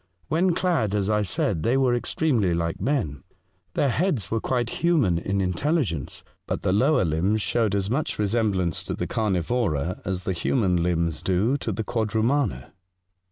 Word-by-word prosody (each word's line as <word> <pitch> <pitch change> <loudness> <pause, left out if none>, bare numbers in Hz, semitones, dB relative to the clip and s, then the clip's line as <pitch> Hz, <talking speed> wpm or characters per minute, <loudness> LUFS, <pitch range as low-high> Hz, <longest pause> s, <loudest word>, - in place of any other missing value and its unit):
When 170 +3 +2
clad 140 - +1
as 105 0 0
I 105 0 +2
said, 95 -3 -1
they 120 +10 +2
T^ 135 -1 +3
ere 120 - +3
extremely 120 - +1
like 85 -1 -2
men. 110 - -1 0.5
Their 140 - +2
heads 145 - 0
were 115 - +1
quite 120 -2 -2
human 145 - +3
in 95 +3 -1
intelligence, 95 - -1 0.2
but - - -3
their 95 - +2
lower 130 +3 +3
limbs 90 +7 +1
showed 110 -4 +1
as 100 -1 0
much 135 +8 -1
resemblance 100 -5 0
to - - -3
the - - -3
carnivora 90 - -1
as 95 -1 -3
the 95 - -1
human 90 0 +1
limbs 85 -2 0
do 95 +8 +1
to 115 - -3
the 110 +3 -2
quad 110 -1 -2
rumana 130 +6 0
105 Hz, 170 wpm, -25 LUFS, 90-125 Hz, 0.5 s, T^